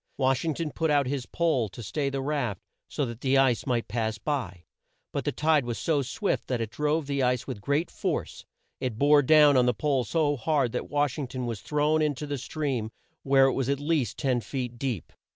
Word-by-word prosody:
Wash 130 Hz, -1 st, +2 dB
ing 160 Hz, -3 st, -1 dB
ton 165 Hz, -3 st, -3 dB
put 160 Hz, +2 st, -1 dB
out 145 Hz, -2 st, +3 dB
his 130 Hz, -1 st, -3 dB
pole 150 Hz, -10 st, +1 dB
to 115 Hz, +6 st, -9 dB
stay 140 Hz, +7 st, -1 dB
the 135 Hz, 0 st, -3 dB
raft 135 Hz, -, -1 dB, 0.3 s
so 145 Hz, -, -1 dB
that 120 Hz, 0 st, -7 dB
the 135 Hz, 0 st, +2 dB
ice 135 Hz, -1 st, +2 dB
might 120 Hz, -3 st, 0 dB
pass 110 Hz, 0 st, -2 dB
by; 105 Hz, -, -3 dB, 0.5 s
but -, -, -3 dB
the -, -, +1 dB
tide 155 Hz, -2 st, +2 dB
was 120 Hz, -1 st, -3 dB
so 155 Hz, -4 st, +1 dB
swift 140 Hz, -, -2 dB
that 125 Hz, -2 st, -1 dB
it 115 Hz, -1 st, -3 dB
drove 150 Hz, +1 st, 0 dB
the 140 Hz, -1 st, -1 dB
ice 125 Hz, -1 st, +1 dB
with 125 Hz, -7 st, -6 dB
great 145 Hz, -, 0 dB
force. -, -, -3 dB, 0.4 s
It 125 Hz, -5 st, -3 dB
bore 145 Hz, +3 st, +5 dB
down 150 Hz, 0 st, +6 dB
on 125 Hz, -1 st, +4 dB
the 125 Hz, -, +2 dB
pole 140 Hz, -2 st, +1 dB
so 145 Hz, 0 st, +1 dB
hard 135 Hz, 0 st, +1 dB
that 125 Hz, -, -4 dB
Wash 145 Hz, -1 st, 0 dB
ing 140 Hz, -, -3 dB
ton 125 Hz, 0 st, -4 dB
was 115 Hz, -4 st, -4 dB
thrown 150 Hz, +3 st, +1 dB
in 150 Hz, -2 st, +1 dB
to 150 Hz, -, -5 dB
the 145 Hz, -2 st, -3 dB
stream 130 Hz, -6 st, -2 dB, 0.3 s
where 135 Hz, 0 st, +5 dB
it 135 Hz, -, +2 dB
was 135 Hz, -1 st, -1 dB
at 140 Hz, -1 st, +1 dB
least 145 Hz, -, 0 dB
ten 130 Hz, -3 st, 0 dB
feet 125 Hz, -2 st, -5 dB
deep. 125 Hz, -, -3 dB
135 Hz, 225 wpm, -27 LUFS, 125-150 Hz, 0.5 s, down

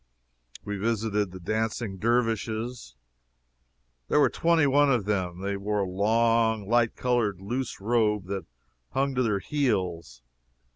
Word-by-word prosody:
We 105 Hz, 0 st, -3 dB
visited 105 Hz, -1 st, 0 dB
the 95 Hz, +1 st, -10 dB
Dancing 110 Hz, +1 st, -2 dB
Dervishes. 115 Hz, -, -1 dB, 1.1 s
There -, -, +3 dB
were -, -, +4 dB
twenty 165 Hz, -2 st, +3 dB
one 140 Hz, +1 st, +4 dB
of 120 Hz, -6 st, +1 dB
them. 95 Hz, -4 st, -2 dB
They 100 Hz, 0 st, -2 dB
wore 105 Hz, +1 st, -1 dB
a 95 Hz, -, -1 dB
long, 110 Hz, +2 st, +2 dB
light 120 Hz, 0 st, +2 dB
colored 120 Hz, -7 st, 0 dB
loose 120 Hz, +6 st, -4 dB
robe 105 Hz, -2 st, +1 dB
that 95 Hz, 0 st, -5 dB, 0.5 s
hung 135 Hz, +1 st, +1 dB
to 130 Hz, -, 0 dB
their 110 Hz, -5 st, +1 dB
heels. 95 Hz, -, -2 dB
110 Hz, 135 wpm, -27 LUFS, 100-120 Hz, 1.1 s, were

